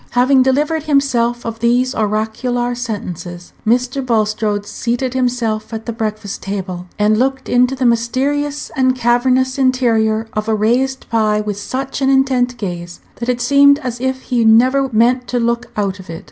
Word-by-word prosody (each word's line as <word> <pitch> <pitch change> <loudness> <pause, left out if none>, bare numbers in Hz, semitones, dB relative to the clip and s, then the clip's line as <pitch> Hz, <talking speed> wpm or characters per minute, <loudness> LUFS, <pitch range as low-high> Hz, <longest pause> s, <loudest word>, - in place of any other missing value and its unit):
Having 260 +2 +5
delivered 295 +5 +1
himself 245 -5 +1
of 225 -1 -5
these 245 +3 +2
oracular 220 +3 -1
sentences, 180 -7 -6
Mr. 250 +3 +1
Bulstrode 215 -3 0
seated 240 +4 -2
himself 240 -4 -1
at 220 - -7
the 235 - -4
breakfast 215 -2 -4
table, 185 -2 -5
and 215 +1 +2
looked 265 +1 -1
into 250 +2 +2
the 260 -1 -1
mysterious 275 +5 0
and 260 -1 +2
cavernous 255 +2 +1
interior 230 -4 +2
of 215 +1 -2
a 220 - +2
raised 250 +5 0
pie 215 -2 +2
with 210 -1 -3
such 265 +5 -4
an 270 - +2
intent 260 -2 +2
gaze 175 -5 -6 0.2
that 235 +1 -4
it 245 -1 0
seemed 280 +3 +5
as 250 -3 -5
if 260 0 -2
he 240 -2 0
never 255 +5 +4
meant 245 +3 +2
to 245 - -1
look 235 +1 -1
out 200 -2 -1
of 185 - -13
it. 165 0 -6
240 Hz, 165 wpm, -17 LUFS, 215-260 Hz, 0.2 s, Having